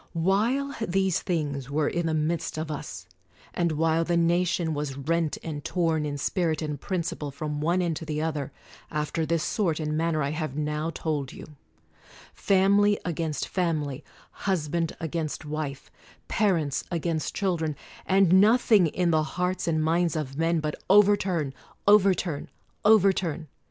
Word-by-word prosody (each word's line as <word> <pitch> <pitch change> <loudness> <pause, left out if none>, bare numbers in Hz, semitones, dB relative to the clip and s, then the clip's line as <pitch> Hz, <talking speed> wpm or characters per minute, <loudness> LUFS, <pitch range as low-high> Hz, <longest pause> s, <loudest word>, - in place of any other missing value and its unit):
While 220 +11 +1
these 190 -3 +1
things 145 -6 -2
were 145 +1 +1
in 170 -1 -1
the 160 - 0
midst 155 +1 -1
of 155 0 -3
us; 90 - -6 0.5
and 170 -2 0
while 165 +1 +2
the 170 0 +1
nation 170 -1 +1
was 145 -2 -3
rent 160 +2 0
and 150 -3 -5
torn 165 -4 0
in 145 -1 -3
spirit 160 +1 0
and 150 -2 -4
principle 170 -5 -3
from 150 +1 -4
one 175 +4 +1
end 165 -3 -1
to 160 - -7
the 155 -1 -3
other, 150 -3 -2 0.4
after 150 +1 -2
this 165 -1 +1
sort 170 -7 0
and 155 -1 -2
manner 160 -1 0
I 140 - -1
have 155 -3 -3
now 150 +1 -2
told 150 -5 -3
you; - - -10 0.9
fam 195 +1 +3
ily 205 0 +3
against 165 -3 -2
family, 155 -6 -1 0.3
husband 170 -3 -1
against 160 -1 -3
wife, 150 -2 -5 0.4
pa 215 - +1
rents 155 -7 0
against 165 -2 -2
children; 170 -6 -1 0.3
and 190 -1 +5
nothing 215 -4 +5
in 175 +2 0
the 155 -1 +3
hearts 180 +4 -2
and 155 -2 +1
minds 165 +1 +1
of 140 -4 -3
men 165 +1 +1
but 150 0 -2 0.2
"Overturn, 190 -7 +4 0.3
overturn, 190 -7 +3 0.3
overturn!" 190 -7 +3
165 Hz, 155 wpm, -26 LUFS, 150-180 Hz, 0.9 s, and